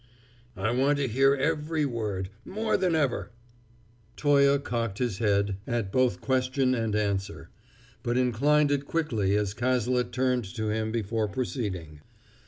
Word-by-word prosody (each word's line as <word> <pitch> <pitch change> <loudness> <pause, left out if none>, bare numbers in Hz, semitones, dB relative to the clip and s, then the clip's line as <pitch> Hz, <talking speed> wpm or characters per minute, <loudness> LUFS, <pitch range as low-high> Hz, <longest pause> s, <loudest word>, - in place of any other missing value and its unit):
"I 110 - 0
want 135 +4 +2
to 140 -1 0
hear 135 +4 +3
every 150 +2 0
word 105 -7 -3
more 215 +2 -1
than 180 -3 +1
ever!" 145 -6 0 0.9
Toye 140 -1 +4
cocked 115 -7 -3
his 115 -6 -2
head 100 -3 +1
at 115 -5 -2
both 125 -6 +1
question 130 0 +1
and 115 -3 -1
answer, 100 -2 -2 0.5
but 120 +1 -1
inclined 140 +4 +3
it 140 0 -1
quickly 115 -12 0
as 105 -2 0
Cazalet 125 0 0
turned 125 -1 0
to 110 -2 -2
him 110 0 -1
before 110 -1 -1
proceeding. 95 - -4
120 Hz, 140 wpm, -27 LUFS, 105-140 Hz, 0.9 s, Toye